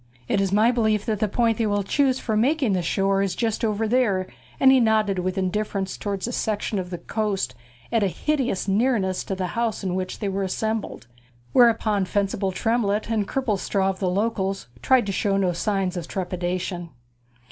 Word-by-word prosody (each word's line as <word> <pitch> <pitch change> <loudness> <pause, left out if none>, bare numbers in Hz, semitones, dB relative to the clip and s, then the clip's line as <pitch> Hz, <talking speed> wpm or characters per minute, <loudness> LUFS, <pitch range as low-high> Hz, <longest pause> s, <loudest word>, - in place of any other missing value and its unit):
'It 200 - +1
is 195 -1 0
my 215 +4 +4
belief 220 -4 +1
that 215 -3 -1
the 215 - +2
point 230 +2 +1
they 225 - +2
will 205 -1 0
choose 265 +5 +2
for 220 -4 -2
making 255 0 +2
the 185 - +1
shore 195 +3 +1
is 195 -3 -1
just 225 0 -1
over 220 0 0
there,' 210 -6 +2 0.3
and 265 - +7
he 265 - +6
nodded 215 -4 +2
with 185 +1 -2
indifference 195 0 -1
towards 200 0 -3
a - - -3
section 215 -3 -1
of 180 -1 -5
the 175 - -4
coast 200 - -2 0.4
at 230 -1 +2
a 200 - +3
hideous 255 - -1
nearness 200 -3 +1
to 195 - -3
the 185 -1 -2
house 230 -3 -1
in 185 -2 -1
which 185 0 -3
they 205 - -3
were 195 0 -1
assembled, 220 +3 -2 0.5
whereupon 225 -4 +4
Fencible 195 0 -1
Tremlett, 215 +1 0
and 210 -3 0
Cripplestraw 200 -6 0
of 190 - -10
the 185 - 0
Locals, 195 - -1 0.2
tried 260 -4 +4
to 200 - -2
show 195 0 0
no 185 -2 +1
signs 195 +1 -1
of 170 -2 -4
trepidation. 180 -1 -3
205 Hz, 190 wpm, -24 LUFS, 190-225 Hz, 0.5 s, and